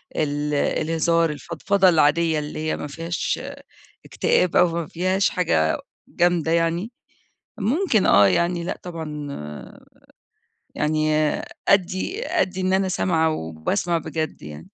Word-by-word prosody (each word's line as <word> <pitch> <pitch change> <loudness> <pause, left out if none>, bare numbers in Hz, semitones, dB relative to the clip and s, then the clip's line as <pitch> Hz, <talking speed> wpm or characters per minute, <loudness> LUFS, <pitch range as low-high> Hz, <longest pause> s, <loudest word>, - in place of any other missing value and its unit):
ال 150 0 -1
الهزار 165 +3 +1
الفضفضة 175 +5 +1
العادية 160 0 +3
اللي 150 +1 -6
هي 155 0 -2
ما 150 - -5
فيهاش 165 +4 -3 0.7
اكتئاب 180 - +1
أو 180 - +6
ما 170 -3 -3
فيهاش 185 +3 +1
حاجة 80 - +1 0.3
جامدة 170 -2 +1
يعني، 170 +6 0 0.7
ممكن 235 - +1
آه 100 0 +6
يعني 170 - +1
لأ 185 - -4
طبعًا 155 -4 -6
آآ 75 - -9 0.9
يعني 155 0 +1
آآ 155 0 +1 0.2
أدّي 200 - +1
أدّي 185 0 -1
إن 185 0 0
أنا 190 0 +2
سامعة 165 -3 +1
وباسمع 100 - -2
بجد 155 - -4
يعني. 75 +1 -9
165 Hz, 125 wpm, -23 LUFS, 150-180 Hz, 0.9 s, أو